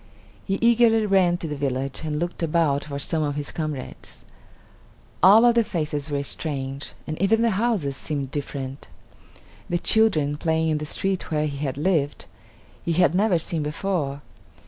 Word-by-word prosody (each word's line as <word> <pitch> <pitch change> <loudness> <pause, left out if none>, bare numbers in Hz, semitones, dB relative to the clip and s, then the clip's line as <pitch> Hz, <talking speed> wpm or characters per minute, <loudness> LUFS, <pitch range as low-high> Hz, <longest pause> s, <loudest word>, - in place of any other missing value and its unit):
He 195 -1 0
eagerly 230 -1 +4
ran 190 -3 +3
to 170 - -5
the 150 - -4
village 135 -1 -2
and 150 -1 -2
looked 175 +3 -3
about 160 -3 +1
for 140 -2 -5
some 155 +3 -2
of 145 -2 -1
his 145 0 -4
comrades. 155 -5 -6 1.0
All 210 +5 +8
of 240 - +6
the 235 0 +4
faces 155 -7 -3
were 140 -1 -1
strange, 140 -1 -5
and 155 +2 -5
even 225 +4 +3
the 230 - +3
houses 190 - 0
seemed 140 -3 -3
different. 140 -1 -5 0.8
The 175 - +1
children, 165 -9 +2
playing 160 0 +1
in 155 -1 0
the 150 - -5
street 190 +2 -2
where 155 -2 0
he 145 -2 -4
had 140 -2 -3
lived, 150 -3 0 0.6
he 170 - -1
had 175 0 +3
never 195 -1 +3
seen 165 0 -2
before. 150 -2 -2
155 Hz, 170 wpm, -24 LUFS, 145-190 Hz, 1.0 s, All